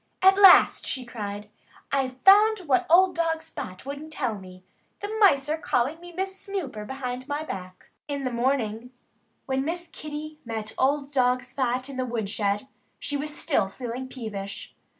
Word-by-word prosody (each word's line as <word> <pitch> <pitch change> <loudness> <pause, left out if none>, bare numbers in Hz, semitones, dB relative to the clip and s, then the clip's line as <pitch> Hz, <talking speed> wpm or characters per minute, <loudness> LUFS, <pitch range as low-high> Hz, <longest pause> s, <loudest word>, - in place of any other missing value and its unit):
"At 385 0 +8
last," 385 -3 +7
she 260 -2 -2
cried, 210 -3 -6 0.4
"I've 260 -2 -1
found 420 +2 +7
out - - -13
what 260 -3 +3
old 365 +2 +6
dog 325 -1 0
Spot 185 -11 -8
wouldn't 285 +3 -7
tell 250 -7 -2
me. 185 -1 -13 0.4
The 410 +2 -4
mice 285 -10 +5
are 310 +1 -1
calling 270 +3 0
me 350 0 -10
'Miss 380 +2 -3
Snooper' 295 - -5
behind 255 0 -5
my 295 +1 -2
back!" 185 -9 -8 0.2
In 285 -1 -3
the 255 - -1
morning, 240 -2 -1 0.6
when 265 0 0
Miss 345 +4 -3
Kitty 305 0 -7
met 220 -2 -5
old 280 +1 +1
dog 250 -1 +2
Spot 255 0 -1
in 275 -2 -7
the 255 - 0
woodshed, 210 -1 -1 0.3
she 290 - -3
was 295 +1 -4
still 270 -11 +1
feeling 245 +4 -6
peevish. 205 -6 -7
265 Hz, 170 wpm, -26 LUFS, 235-310 Hz, 0.6 s, At